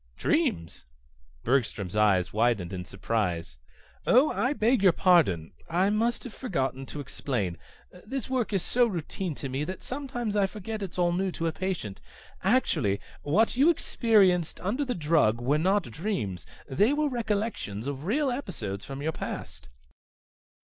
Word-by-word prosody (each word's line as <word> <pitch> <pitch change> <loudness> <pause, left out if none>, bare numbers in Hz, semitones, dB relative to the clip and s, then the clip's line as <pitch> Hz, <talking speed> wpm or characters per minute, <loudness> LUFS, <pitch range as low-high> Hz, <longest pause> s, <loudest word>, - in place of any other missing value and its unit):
"Dreams?" 80 -6 0 0.6
Bergstrom's 110 -7 0
eyes 100 -4 +3
widened 110 -5 +1
in 90 -1 -5
surprise. 90 - -2 0.5
"Oh, 260 +6 +5
I 255 +4 +1
beg 240 -3 +2
your 190 -3 +6
pardon. 145 - +3 0.2
I 185 +4 +2
must 230 +3 0
have 250 - -8
forgotten 135 - -2
to 150 - -7
explain. 120 - -3 0.5
This 265 +2 -3
work 255 -4 -1
is 195 -4 0
so 245 0 +3
routine 175 -3 -4
to 135 - -5
me 135 +2 -2
that 185 +5 -6
sometimes 245 -5 -3
I 200 -2 +3
forget 210 +2 -6
it's 190 -3 -5
all 175 -1 +3
new 185 +2 0
to 165 - -3
a 165 - +1
patient. 175 - -4 0.4
Actually 165 - +2 0.2
what 205 +13 +2
you 280 +6 +5
experienced 200 - +3
under 230 +10 0
the 255 -3 -2
drug 150 -9 +3
were 140 +5 +1
not 195 +5 +2
dreams. 120 - -4 0.2
They 205 - +3
were 300 0 +1
recollections 210 - -2
of 140 +1 -4
real 270 - +1
episodes 120 - -4
from 140 +1 -6
your 160 - 0
past." 115 - -7
175 Hz, 155 wpm, -28 LUFS, -, 0.6 s, your